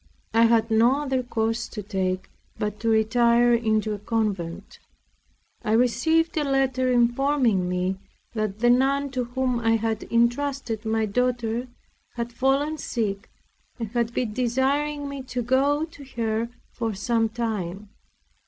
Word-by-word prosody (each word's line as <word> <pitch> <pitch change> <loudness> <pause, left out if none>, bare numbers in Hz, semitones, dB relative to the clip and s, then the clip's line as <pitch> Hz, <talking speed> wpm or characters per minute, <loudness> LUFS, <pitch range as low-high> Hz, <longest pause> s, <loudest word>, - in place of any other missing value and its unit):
I 230 +1 +5
had 230 -1 +3
no 240 +6 +4
other 265 -2 0
course 225 -1 -1
to 210 - -7
take 190 -2 -2 0.3
but 210 0 -3
to 230 - 0
retire 235 +2 +4
into 220 -2 +1
a 205 - -5
convent. 205 -6 -3 0.8
I 215 -2 0
received 255 +8 +2
a 305 - +2
letter 265 -2 +1
informing 240 -5 +2
me 180 +1 -1 0.3
that 215 -2 -3
the 240 0 +5
nun 275 +2 +2
to 255 -2 -2
whom 250 0 -1
I 225 -1 +2
had 225 -1 -2
entrusted 235 -1 0
my 220 0 +1
daughter 245 +1 -1 0.5
had 235 0 -4
fallen 280 +5 +1
sick, 215 -5 -3 0.5
and 235 0 -1 0.2
desiring 275 +5 0
me 280 -1 -5
to 255 -1 -4
go 280 +5 +2
to 320 -3 -14
her 225 0 -1 0.2
for 225 -3 -3
some 225 +2 +1
time. 210 -4 -4
235 Hz, 135 wpm, -25 LUFS, 220-260 Hz, 0.8 s, I